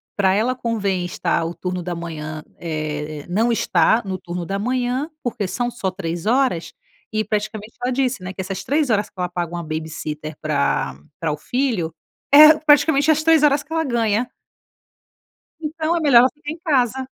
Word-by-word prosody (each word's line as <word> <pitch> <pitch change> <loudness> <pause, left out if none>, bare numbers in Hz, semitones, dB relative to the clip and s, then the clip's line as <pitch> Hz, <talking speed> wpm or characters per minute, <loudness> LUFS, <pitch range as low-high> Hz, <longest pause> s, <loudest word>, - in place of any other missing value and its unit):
pra 190 -2 +3
ela 230 +6 +1
convém 200 -7 -1
estar 170 -1 -1
o 165 - -4
turno 180 -1 -4
da 175 0 -4
manhã, 155 -2 -6
eh, 155 -2 -4
não 220 +6 +2
estar 220 +1 +3
no 190 -1 -3
turno 175 0 -5
da 195 +3 -2
manhã, 250 +5 -1
porque 220 -5 -2
são 240 +7 -2
só 195 -6 -3
três 175 -2 -5
horas 240 -8 +1 0.4
e, 215 0 +1
praticamente, 215 +1 -3
ela 250 - 0
disse, 255 -5 -1
né, 185 +1 -5
que 190 - -5
essas 190 0 -5
3 290 0 +1
horas 210 -2 +2
que - - -46
ela 180 -1 -2
paga 175 -1 -3
uma 170 0 -4
babysitter 155 -1 -5
pra 70 -1 0 0.2
pra 160 -3 -1
o 150 - -5
filho 225 - -1 0.4
é 305 +1 +10
praticamente 295 0 +4
as 310 - +2
3 320 -1 +5
horas 290 0 +4
que 310 - -28
ela 325 0 +1
ganha. 235 -3 0 1.3
Então 320 +1 -1
é - - 0
melhor 280 -6 +6
ela 255 +2 +6
ficar 295 +1 -8
em 320 - -7
casa. 265 - +1
210 Hz, 185 wpm, -21 LUFS, 170-265 Hz, 1.3 s, é